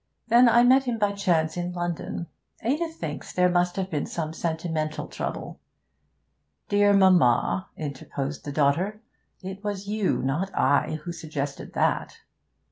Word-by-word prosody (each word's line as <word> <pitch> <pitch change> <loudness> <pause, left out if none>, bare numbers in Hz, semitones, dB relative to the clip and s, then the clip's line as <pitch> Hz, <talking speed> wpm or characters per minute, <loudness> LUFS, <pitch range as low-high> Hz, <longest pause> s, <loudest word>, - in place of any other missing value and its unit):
Then 240 +2 +7
I 235 +1 +6
met 260 +2 +5
him 240 -2 -1
by 205 -2 +2
chance 175 -6 +1
in 175 0 -3
London. 175 -1 -3 0.4
Ada 295 +9 +1
thinks 165 - -6
there 180 0 +3
must 175 0 +1
have 190 -1 -3
been 150 -3 -1
some 160 -2 -4
sentimental 160 -2 -2
trouble.' - - -5 1.1
'Dear 205 0 +4
mamma,' 125 - +4
interposed 140 -1 -5
the 145 - -5
daughter, 170 +10 +1 0.4
'it 190 +2 -7
was 205 -1 -3
you, 210 -1 0
not 150 +9 -1
I, 140 +3 +2
who 175 - -4
suggested 150 -4 -5
that.' - - 0
175 Hz, 140 wpm, -26 LUFS, 155-205 Hz, 1.1 s, Then